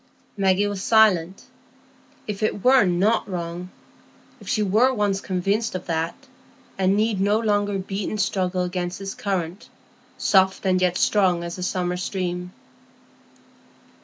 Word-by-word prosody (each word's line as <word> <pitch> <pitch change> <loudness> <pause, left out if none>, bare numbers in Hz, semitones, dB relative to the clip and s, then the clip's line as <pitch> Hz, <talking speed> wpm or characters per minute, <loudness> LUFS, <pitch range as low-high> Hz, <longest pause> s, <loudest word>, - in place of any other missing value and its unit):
Maggie 195 0 +2
was 205 -2 -3
silent. 195 -5 +3 0.8
If 210 -1 -5
it 215 -2 -1
were 255 -3 +6
not 195 +5 +1
wrong—if 175 0 -9
she 215 - +1
were 220 +7 +3
once 205 -5 0
convinced 195 +4 -1
of 185 - -5
that, 165 0 -2 0.6
and 190 +1 +2
need 215 -2 +1
no 205 +2 +3
longer 205 -2 0
beat 195 +1 -4
and 215 - -4
struggle 185 -1 0
against 180 0 -3
this 195 0 -6
current, 190 0 -4 0.5
soft 190 0 +2
and 185 -1 +2
yet 180 -1 +2
strong 185 -5 +2
as 170 +1 -6
the - - -7
summer 180 0 -1
stream! 180 -1 -3
190 Hz, 135 wpm, -23 LUFS, 180-205 Hz, 0.8 s, were